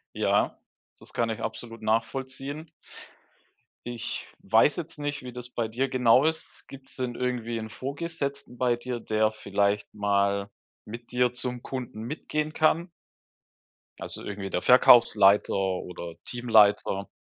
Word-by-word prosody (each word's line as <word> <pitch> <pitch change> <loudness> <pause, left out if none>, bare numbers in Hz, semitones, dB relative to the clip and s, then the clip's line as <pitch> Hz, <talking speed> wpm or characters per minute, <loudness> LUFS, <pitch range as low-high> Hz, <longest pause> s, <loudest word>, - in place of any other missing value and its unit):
Ja, - - +1 0.4
das - - -9
kann 115 -1 0
ich 110 - -4
absolut 115 0 -6
nachvollziehen. 130 +7 -2 1.2
Ich 120 -2 -4
weiß 110 +8 +4
jetzt 170 -3 -6
nicht, 145 -1 -3
wie 125 -1 -8
das 125 0 -8
bei 120 -2 -2
dir 125 +5 -1
genau 130 +2 +4
ist. 160 0 -3
Gibt's 135 0 -11
denn 125 -2 -2
irgendwie 120 -2 -2
'n 110 0 -6
Vorgesetzten 140 -1 -5
bei 125 -2 +2
dir, 120 0 -5
der 110 0 +1
vielleicht 100 -1 -1
mal 100 -1 +1 0.3
mit 115 +3 -10
dir 125 0 +2
zum 125 0 -4
Kunden 125 -4 -6
mitgehen 150 +3 -3
kann? 165 +3 +2 1.1
Also, - - -6
irgendwie 100 -1 -5
der 90 - -1
Verkaufsleiter 110 -5 +6
oder 90 -3 -3
Teamleiter, 105 -4 +3
120 Hz, 130 wpm, -27 LUFS, 110-130 Hz, 1.2 s, Verkaufsleiter